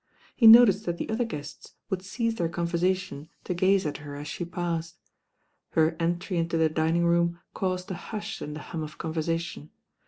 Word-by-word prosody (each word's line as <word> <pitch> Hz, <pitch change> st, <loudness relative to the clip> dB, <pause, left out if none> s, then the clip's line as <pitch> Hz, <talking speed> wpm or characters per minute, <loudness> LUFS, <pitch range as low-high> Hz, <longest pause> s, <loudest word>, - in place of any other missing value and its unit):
He 230 Hz, -, +6 dB
noticed 220 Hz, -3 st, +8 dB
that 170 Hz, 0 st, -1 dB
the -, -, -4 dB
other 235 Hz, +2 st, 0 dB
guests 150 Hz, -10 st, -8 dB, 0.2 s
would 190 Hz, -1 st, -1 dB
cease 230 Hz, +4 st, -2 dB
their 170 Hz, -7 st, -1 dB
conversation 170 Hz, -2 st, -1 dB
to -, -, -2 dB
gaze 185 Hz, +1 st, +2 dB
at 145 Hz, -2 st, -2 dB
her 145 Hz, 0 st, -9 dB
as 145 Hz, +1 st, -7 dB
she 175 Hz, -, -4 dB
passed. 170 Hz, -1 st, -3 dB, 0.8 s
Her 160 Hz, 0 st, +3 dB
entry 175 Hz, +2 st, -1 dB
into 165 Hz, 0 st, 0 dB
the 160 Hz, -1 st, +3 dB
dining 160 Hz, +2 st, +1 dB
room 170 Hz, 0 st, +2 dB
caused 185 Hz, -1 st, -2 dB
a 175 Hz, -, -7 dB
hush 215 Hz, 0 st, -5 dB
in 150 Hz, 0 st, -5 dB
the 155 Hz, -, -7 dB
hum 165 Hz, -, -6 dB
of 155 Hz, 0 st, -7 dB
conversation. 165 Hz, -1 st, -3 dB
170 Hz, 185 wpm, -27 LUFS, 160-185 Hz, 0.8 s, noticed